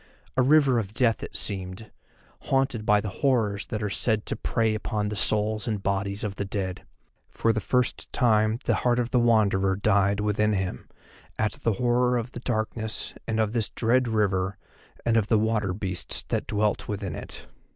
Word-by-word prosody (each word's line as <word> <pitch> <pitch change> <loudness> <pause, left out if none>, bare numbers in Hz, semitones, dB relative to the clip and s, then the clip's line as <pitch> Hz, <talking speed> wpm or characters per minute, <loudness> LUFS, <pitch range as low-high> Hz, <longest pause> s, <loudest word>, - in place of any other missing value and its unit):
A 130 - +3
River 135 -2 +4
of 105 0 -6
Death 120 -2 +2
it - - -7
seemed, 95 +1 -2 0.6
haunted 135 -5 +1
by 105 0 +4
the 105 - -4
horrors 115 -8 +1
that 110 -1 -3
are 105 - -1
said 110 -1 0
to - - -3
prey 110 0 0
upon 105 -1 -2
the 105 - -4
souls 105 +2 +1
and 105 -4 -2
bodies 100 +1 -1
of 100 -2 -4
the - - -1
Dead. 95 -2 -4 0.4
For 115 - +1
the 110 - -1
first 125 +4 -1
time 110 -2 +2
the - - +2
heart 120 -1 +2
of 120 -1 -1
the 125 - +3
Wanderer 100 -5 +3
died 100 0 +2
within 105 +1 +1
him, 95 -8 -3 0.5
at 110 -1 +1
the 115 - -1
horror 125 +2 +2
of 120 +1 -4
the 120 - -7
darkness 110 -2 -2
and 110 -1 -1
of 110 -1 +1
this 115 -3 0
dread 125 +2 +1
river 100 -3 0 0.5
and 115 -1 +3
of 110 -2 +2
the 110 - +3
water 105 -2 +1
beasts 95 -1 -3
that - - -1
dwelt 105 0 0
within 100 -4 -4
it. - - -9
110 Hz, 185 wpm, -26 LUFS, 100-115 Hz, 0.6 s, River